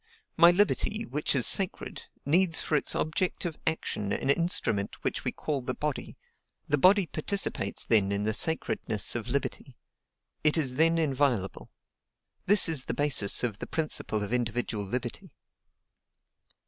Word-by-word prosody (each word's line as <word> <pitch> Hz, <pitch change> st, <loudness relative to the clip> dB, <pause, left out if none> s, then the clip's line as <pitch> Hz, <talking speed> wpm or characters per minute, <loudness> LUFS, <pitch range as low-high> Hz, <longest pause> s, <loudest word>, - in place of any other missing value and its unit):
My 170 Hz, +1 st, +7 dB
liberty, 205 Hz, +4 st, +1 dB
which 150 Hz, -7 st, -2 dB
is 125 Hz, -, +3 dB
sacred, 190 Hz, -2 st, +4 dB, 0.2 s
needs 165 Hz, +3 st, +2 dB
for 155 Hz, -, -1 dB
its -, -, 0 dB
objective 170 Hz, 0 st, -3 dB
action 105 Hz, -10 st, -2 dB
an 135 Hz, -, 0 dB
instrument 130 Hz, -, -1 dB
which -, -, -3 dB
we -, -, -2 dB
call 145 Hz, -3 st, -4 dB
the 125 Hz, -, -4 dB
body: 150 Hz, -2 st, -5 dB, 0.5 s
the 145 Hz, -, 0 dB
body 190 Hz, +4 st, +5 dB
participates 160 Hz, -, -3 dB
then 100 Hz, -4 st, +2 dB
in 100 Hz, 0 st, -2 dB
the 110 Hz, +1 st, -1 dB
sacredness 110 Hz, -7 st, -1 dB
of 120 Hz, 0 st, -5 dB
liberty; 135 Hz, -1 st, -4 dB, 0.7 s
it 150 Hz, +2 st, +3 dB
is 135 Hz, -5 st, 0 dB
then 165 Hz, +1 st, +3 dB
inviolable. 135 Hz, -, -1 dB, 0.8 s
This 205 Hz, 0 st, +7 dB
is 155 Hz, -5 st, 0 dB
the -, -, -4 dB
basis 140 Hz, -9 st, +2 dB
of 110 Hz, -5 st, -3 dB
the -, -, -7 dB
principle 150 Hz, -9 st, -2 dB
of 105 Hz, +4 st, -5 dB
individual 120 Hz, -3 st, -2 dB
liberty. 125 Hz, -, -5 dB
145 Hz, 145 wpm, -28 LUFS, 115-165 Hz, 0.8 s, My